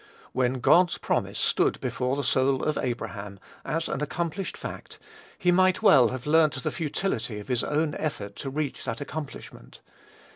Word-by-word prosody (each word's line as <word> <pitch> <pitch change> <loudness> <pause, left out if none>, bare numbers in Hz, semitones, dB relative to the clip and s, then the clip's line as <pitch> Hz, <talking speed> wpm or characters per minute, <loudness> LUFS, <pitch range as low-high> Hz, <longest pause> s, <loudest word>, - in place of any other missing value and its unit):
When 130 0 0
God's 175 +6 +5
promise - - -1
stood - - +2
before 125 +1 -1
the 145 - -2
soul 130 +1 +2
of 155 - 0
Abraham, 105 -5 -4 0.2
as 165 +1 -2
an 140 - -3
accomplished 170 +5 -3
fact, - - -8 0.4
he 180 -1 +2
might 185 +3 +3
well 130 - +7
have 130 +1 -5
learnt 150 -3 +3
the - - -1
futility 140 - -2
of 105 - -11
his 125 -2 +1
own 150 +1 0
effort 100 -10 -4
to 135 - -4
reach 145 0 -3
that 115 - -3
accomplishment. 145 0 -8
140 Hz, 160 wpm, -27 LUFS, 125-160 Hz, 0.4 s, well